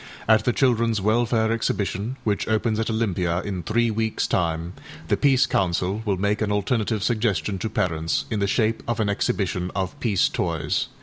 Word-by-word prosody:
At 110 -1 +4
the 125 - +3
Childrenâs 115 -4 +2
Welfare 110 +2 +2
Exhibition, 110 +1 -2
which 105 -2 -1
opens 110 0 +1
at 115 - -1
Olympia 95 -6 0
in 95 -3 -4
three 115 +7 +1
weeksâ 110 0 -1
time, 85 0 -1 0.4
the - - +4
Peace 135 -2 +4
Council 95 0 0
will 100 -3 0
make 100 +3 0
an 105 -1 0
alternative 105 +1 0
suggestion 105 -6 0
to 110 - -2
parents 80 -5 -1
in 110 - 0
the 100 - +1
shape 110 +2 +1
of 120 -1 -1
an 105 -2 +1
exhibition 95 -3 -1
of 95 +9 -3
âpeace 110 - +1
toys. - - -1
105 Hz, 175 wpm, -24 LUFS, 95-115 Hz, 0.4 s, At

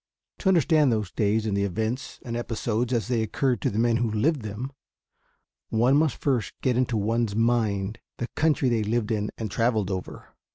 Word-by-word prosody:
To - - -2
understand 160 -6 +4
those 105 -5 -1
days 110 +1 +1
and 105 -2 0
the 100 - +1
events 110 +6 -3
and 115 -1 -4
episodes 120 0 -2
as 120 -3 0
they 120 -3 +1
occurred 125 +3 0
to - - +1
the 105 - -4
men 115 0 +3
who 120 -1 0
lived 130 +7 +1
them, 110 +5 -5 1.0
one 120 +5 +3
must 150 -1 +2
first 130 -6 0
get 130 -3 +2
into 125 -2 +1
one's 110 0 0
mind 110 -3 +1 0.2
the 120 - -3
country 155 -4 +1
they 120 -2 +2
lived 110 +1 -1
in 105 -1 0
and 110 -3 -4
traveled 110 -4 +1
over. 95 -1 -6
115 Hz, 190 wpm, -26 LUFS, 105-125 Hz, 1.0 s, understand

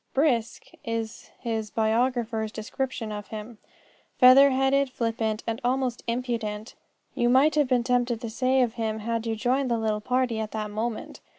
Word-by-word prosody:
"Brisk" 250 -5 +1 0.2
is 230 -1 -4
his 225 -3 -3
biographer's 225 0 0
description 230 0 -4
of 210 -1 -6
him. 215 +1 -8 0.6
Feather 265 +2 +8
headed, 270 +1 +2
flippant, 225 -3 -2
and 230 0 -3
almost 250 -1 -1
impudent, 230 -3 -3 0.4
you 240 -2 +1
might 270 +5 +5
have 295 -2 +2
been 250 -2 +2
tempted 245 -1 +1
to 230 -1 -5
say 260 +2 +2
of 235 -2 -1
him 220 -2 -2
had 230 +1 -3
you 225 - -1
joined 255 +4 0
the 235 - +1
little 215 -1 -1
party 250 -1 0
at 220 -1 -4
that 215 -1 -3
moment. 220 +1 -4
235 Hz, 165 wpm, -26 LUFS, 220-255 Hz, 0.6 s, Feather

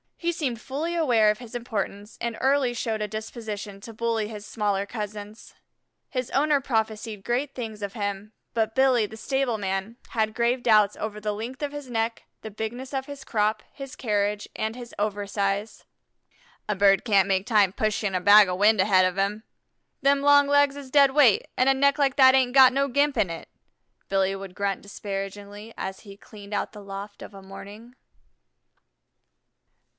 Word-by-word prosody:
He 345 0 -1
seemed 260 -9 -3
fully 310 +6 -3
aware 240 -10 +3
of 210 - -4
his 240 -3 -11
importance, 210 -3 -4
and 235 -1 -3
early 270 -2 +2
showed 225 -2 -2
a 210 - -1
disposition 215 -2 -6
to 225 +2 -10
bully 225 -1 -1
his 210 -1 -8
smaller 205 -3 -1
cousins. 210 0 -8 0.5
His 255 -3 -3
owner 290 +1 +3
prophesied 220 -3 -2
great 260 +5 -1
things 220 -4 -6
of 200 -1 -4
him, 205 -1 -4 0.2
but 220 -1 0
Billy, 260 -4 +3
the 220 +2 -10
stable 265 -1 -1
man, 195 +3 -3
had 220 -1 -1
grave 240 +1 +1
doubts 210 -3 +4
over 210 -1 -5
the 210 0 -2
length 235 +6 -6
of 290 -1 -2
his 290 -3 -8
neck, 225 -1 -2 0.2
the 220 - -7
bigness 235 +6 -6
of 265 -1 -2
his 285 -1 -8
crop, 215 -2 0
his 275 -1 -9
carriage, 205 -2 -1
and 220 +1 -3
his 245 -1 -10
over 205 -1 -2
size. 200 +1 -2 0.8
"A 210 - +1
bird 195 -1 +4
can't 200 -4 +3
make 190 0 +1
time 210 -5 +3
pushing 210 -2 -1
a 180 - 0
bag 205 +1 +8
of 180 0 -2
wind 210 +1 +4
ahead 190 -1 +4
of 185 0 -1
him. 200 +2 -1 0.6
Them 280 0 +3
long 285 0 +5
legs 285 -1 +3
is 280 -2 -9
dead 280 0 +5
weight, 265 -7 +4
an' 255 - +3
a 270 - +6
neck 280 +2 +2
like 275 -3 +2
that 260 -1 +7
ain't 255 -2 +2
got 265 -1 +8
no 275 +1 +1
gimp 285 +1 +1
in 205 -5 +2
it," 165 - -7 0.6
Billy 195 0 +1
would 195 -1 -9
grunt 200 -1 -2
disparagingly 200 +2 -7
as 190 0 -5
he 200 -2 -13
cleaned 205 0 -12
out 205 - -2
the 210 -1 -11
loft 200 +1 -8
of - - -10
a 195 - -10
morning. 205 +5 -11
220 Hz, 185 wpm, -25 LUFS, 205-255 Hz, 0.8 s, bag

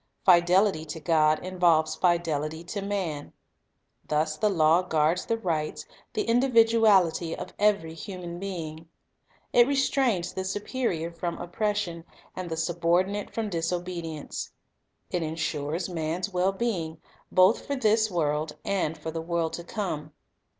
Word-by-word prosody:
Fidelity 180 -1 +5
to 160 +1 -7
God 155 -1 +2
involves 170 -4 +2
fidelity 160 -3 0
to 195 +4 -5
man. 185 -8 -3 0.7
Thus 155 0 0
the 210 +7 +1
law 165 -2 +4
guards 165 -1 +1
the 230 - +1
rights, 155 -6 -2 0.3
the - - -1
individuality, 225 -9 +4
of 180 - -8
every 200 -6 +2
human 175 0 -7
being. 165 -4 -6 0.6
It 240 0 +6
restrains 270 -9 +1
the 190 - -3
superior 190 -3 -2
from 170 +1 -4
oppression, 175 -3 -2 0.3
and 185 -1 -5
the 160 - -2
subor 170 +2 +2
dinate 205 +1 -5
from 225 -2 -2
disobedience. 170 -2 -3 0.6
It 180 - 0
insures 155 +1 -2
man's 175 +2 -3
well 180 +2 +2
being, 185 -7 -2 0.3
both 185 +5 +4
for 285 - -1
this 220 -3 +3
world 150 -3 -1
and 180 -5 0
foi 160 +1 -5
the 165 0 -4
world 165 -1 -1
to 170 - -5
come. 160 -7 -4
175 Hz, 135 wpm, -27 LUFS, 160-195 Hz, 0.7 s, It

